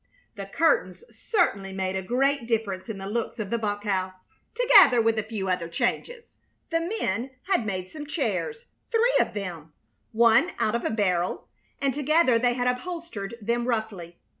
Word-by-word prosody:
The - - -7
curtains - - +1
certainly 200 - 0
made 190 0 -2
a 190 - -1
great 255 +4 0
difference 220 -3 -2
in 215 - -4
the 195 - -7
looks 230 +3 -3
of 210 -3 -5
the 235 - 0
bunk 205 -1 -2
house, 190 -2 -1 0.4
together 470 - +7
with 225 -1 +2
a - - -2
few 210 -3 -4
other 180 -2 -1
changes. 470 - -3 0.3
The 330 0 +1
men 270 - -2
had 365 - 0
made 185 -2 -3
some 295 +8 -9
chairs 305 - -2 0.2
three 475 +2 +2
of - - 0
them, 170 -6 -6 0.4
one 235 +8 +4
out 215 - 0
of 235 - -1
a - - +1
barrel; 185 -5 -1 0.3
and 275 -1 0
together 295 -3 +3
they 245 0 +2
had 245 -1 -1
upholstered 250 - -4
them 235 +2 -1
roughly. 210 -8 -3
230 Hz, 170 wpm, -26 LUFS, 195-285 Hz, 0.4 s, together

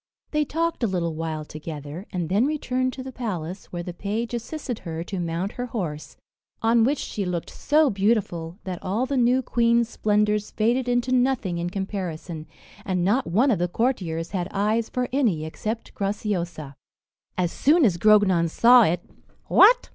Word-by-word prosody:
They 300 -1 +1
talked 330 +2 -1
a - - +3
little 175 -4 -1
while 155 -1 -4
together, 155 +3 -7
and 175 -3 -2
then 205 - +2
returned 255 -4 -1
to 260 - -7
the 260 - -7
palace, 190 -7 -5
where 175 -1 -5
the 180 - -6
page 215 +6 -3
assisted 245 0 -4
her 165 -1 -5
to 190 +1 -5
mount 170 +3 -2
her 245 0 -5
horse; 170 -11 -5 0.4
on 225 0 +3
which 280 +5 +2
she 205 - -4
looked 180 -2 -3
so 300 -1 +2
beautiful, 195 -5 0
that 185 -2 -5
all 210 +7 -1
the 280 +1 -2
new 250 +1 +3
queen's 235 -1 +2
splendours 210 -1 +1
faded 240 +3 +1
into 245 +1 +1
nothing 245 -9 +1
in 175 +1 -2
comparison, 180 -4 -5 0.4
and 180 -3 -1
not 240 +8 +2
one 230 +11 +3
of 205 - +1
the 175 - +1
courtiers 175 -6 -1
had 180 -3 -2
eyes 215 +3 0
for 250 -1 -1
any 215 - +1
except 220 +8 -5
Graciosa. 180 -7 -3 0.6
As 175 -2 +1
soon 310 +1 +4
as 185 -6 +2
Grognon 190 -4 +4
saw 240 +8 +7
it, 175 -4 +2 0.5
"What!" - - +6
205 Hz, 170 wpm, -24 LUFS, 175-245 Hz, 0.6 s, saw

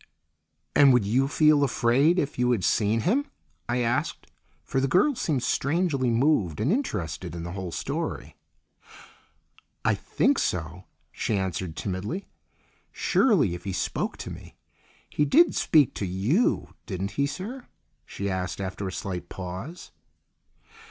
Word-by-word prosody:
"And 140 -2 +7
would 125 -5 +3
you 125 +7 +2
feel 150 0 +4
afraid 135 +6 +3
if 145 -6 -1
you 125 0 +3
had 115 -7 +1
seen 110 +3 +2
him?" 260 - +1 0.4
I 125 +1 +1
asked, 120 +6 -1 0.4
for 135 - -1
the 135 - +1
girl 190 - +3
seemed 150 - -1
strangely 140 -1 +1
moved 115 - +2
and 120 +10 +1
interested 95 - -3
in 85 - -5
the 85 - -5
whole 95 -2 -5
story. - - -4 1.5
"I - - +4
think - - +1
so," 85 +1 -2 0.3
she 110 - -1
answered 95 -3 -3
timidly. 100 - -4 0.7
"Surely, 185 - +2
if 85 0 -7
he 95 - -4
spoke - - -2
to - - -7
me. - - -11 0.5
He 150 - 0
did 320 - +5
speak 150 -6 +3
to 100 - -3
you, 105 - +1
didn't 95 -1 -3
he, 140 0 0
sir?" 225 - -7 0.4
she 100 - -5
asked 95 -1 -3
after 95 0 -4
a - - -4
slight 90 -2 -5
pause. 95 - -7
120 Hz, 145 wpm, -26 LUFS, 95-150 Hz, 1.5 s, And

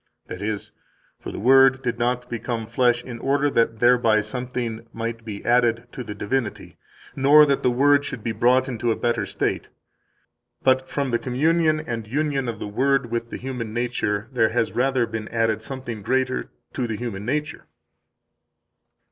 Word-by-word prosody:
[That 90 - -8
is: 105 0 -3 0.5
For - - -7
the - - -7
Word 135 +3 +5
did 120 -2 -2
not 125 +1 0
become 120 -1 -4
flesh 120 +1 +1
in 120 -2 -8
order 140 +2 +1
that 115 -2 +1
thereby 120 -2 +4
something 120 -2 -5
might 115 0 -5
be 105 -2 -7
added 120 0 +2
to 125 - -6
the 105 -3 -7
divinity, 105 +2 -3 0.4
nor 145 +3 +7
that 140 -2 +1
the 125 - +3
Word 140 +3 +4
should 120 -6 -6
be 115 - -1
brought 125 +4 +3
into 120 -2 -2
a - - +1
better 120 -1 -1
state, - - -2 1.0
but 130 0 +2
from 140 -3 -2
the 120 - +1
communion 155 +4 +2
and 115 -8 -5
union 140 0 -1
of 115 - -4
the - - -6
Word 130 +3 +1
with 115 0 -2
the - - -5
human 120 -4 -5
nature 115 -3 -1
there 115 -4 +2
has 115 0 0
rather 130 -1 +1
been 110 -1 -5
added 115 -2 0
something 130 -5 -6
greater 130 +4 -1 0.2
to 125 -3 -2
the 110 -2 -3
human 110 -4 -5
nature. 145 +5 -3
120 Hz, 175 wpm, -23 LUFS, 115-130 Hz, 1.0 s, nor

